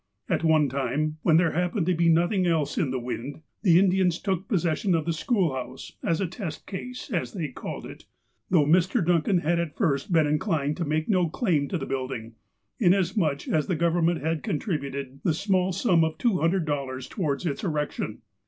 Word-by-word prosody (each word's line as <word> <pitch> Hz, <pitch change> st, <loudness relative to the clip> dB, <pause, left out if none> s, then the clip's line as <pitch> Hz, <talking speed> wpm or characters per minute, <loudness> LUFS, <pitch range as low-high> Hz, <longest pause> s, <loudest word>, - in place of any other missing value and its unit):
At -, -, 0 dB
one 155 Hz, -2 st, +4 dB
time, 140 Hz, +4 st, -2 dB
when 160 Hz, -1 st, +4 dB
there 170 Hz, -2 st, +3 dB
happened 180 Hz, +2 st, 0 dB
to 180 Hz, -, +2 dB
be 170 Hz, 0 st, +3 dB
nothing 175 Hz, +3 st, +3 dB
else 160 Hz, -4 st, +1 dB
in 150 Hz, -, 0 dB
the 130 Hz, -, -1 dB
wind, 125 Hz, +4 st, -5 dB, 0.2 s
the 175 Hz, -6 st, +5 dB
Indians 185 Hz, -2 st, +3 dB
took 190 Hz, -1 st, -2 dB
possession 180 Hz, -3 st, +1 dB
of 160 Hz, -2 st, -1 dB
the 165 Hz, -, 0 dB
school 180 Hz, -, +1 dB
house, 130 Hz, 0 st, -6 dB
as 165 Hz, -, +1 dB
a 195 Hz, -, +1 dB
test 170 Hz, -3 st, -6 dB
case, 250 Hz, +7 st, -7 dB
as 175 Hz, -, -2 dB
they 165 Hz, -7 st, -3 dB
called -, -, -7 dB
it, -, -, -11 dB, 0.4 s
though 165 Hz, -5 st, +4 dB
Mr. 170 Hz, +3 st, +3 dB
Dun 170 Hz, -1 st, +3 dB
can 185 Hz, +4 st, +1 dB
had 170 Hz, +2 st, +1 dB
at 170 Hz, -3 st, -3 dB
first 145 Hz, -, 0 dB
been 160 Hz, -3 st, +4 dB
inclined 150 Hz, -1 st, 0 dB
to 170 Hz, -, -2 dB
make 155 Hz, +1 st, -1 dB
no 185 Hz, -5 st, +2 dB
claim 160 Hz, -, 0 dB
to 180 Hz, -, -2 dB
the -, -, -4 dB
building, 130 Hz, -4 st, -4 dB, 0.5 s
inasmuch 180 Hz, -6 st, +2 dB
as 155 Hz, -2 st, +1 dB
the 180 Hz, -, 0 dB
Government 170 Hz, +1 st, +1 dB
had 160 Hz, +1 st, -1 dB
contributed 140 Hz, -, -3 dB
the 160 Hz, -, +2 dB
small 190 Hz, 0 st, +1 dB
sum 180 Hz, -3 st, +3 dB
of 160 Hz, 0 st, -1 dB
$200 155 Hz, -, 0 dB
towards 155 Hz, -5 st, -2 dB
its 145 Hz, +2 st, -2 dB
erection. 150 Hz, -5 st, -3 dB
165 Hz, 190 wpm, -26 LUFS, 150-180 Hz, 0.5 s, the